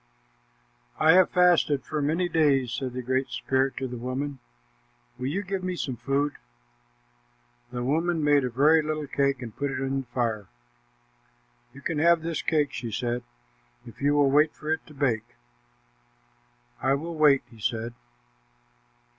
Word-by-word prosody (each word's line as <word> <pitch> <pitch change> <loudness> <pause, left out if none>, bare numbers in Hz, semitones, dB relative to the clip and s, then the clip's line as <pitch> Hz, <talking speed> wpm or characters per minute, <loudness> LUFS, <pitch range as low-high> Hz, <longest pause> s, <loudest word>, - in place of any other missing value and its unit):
"I 160 - +5
have 185 +1 +6
fasted 175 -6 +3
for 155 -1 -2
many 165 +5 +1
days," 145 -7 +2
said 130 -1 -3
the 125 0 -4
Great 130 +2 0
Spirit 135 0 0
to 135 - -2
the 125 -1 -7
woman. 130 +3 -4 0.8
"Will 125 - -2
you 190 +9 -2
give 190 -1 -4
me 185 0 -2
some 135 -7 -3
food?" 135 +5 -1 1.3
The 120 -1 -3
woman 160 +4 0
made 145 -1 +4
a 125 - -1
very 150 +6 +4
little 155 0 -3
cake 140 -2 0
and 115 -3 -8
put 140 0 -2
it 135 - -3
on 135 0 -1
the 130 - -15
fire. 115 -5 -2 1.2
"You 140 - -13
can 160 -1 -2
have 170 0 +4
this 165 -1 -2
cake," 150 -3 +1
she 115 -2 -5
said, 120 +3 -2 0.6
"if 115 - -13
you 145 +1 +3
will 145 -2 +4
wait 150 +2 +4
for 155 +1 -2
it 160 - -4
to 150 - -14
bake." 125 -6 -1 1.5
"I 135 +2 +2
will 165 +4 -5
wait," 150 -4 +4
he 115 - -15
said. 115 +2 -2
140 Hz, 165 wpm, -26 LUFS, 130-155 Hz, 1.5 s, have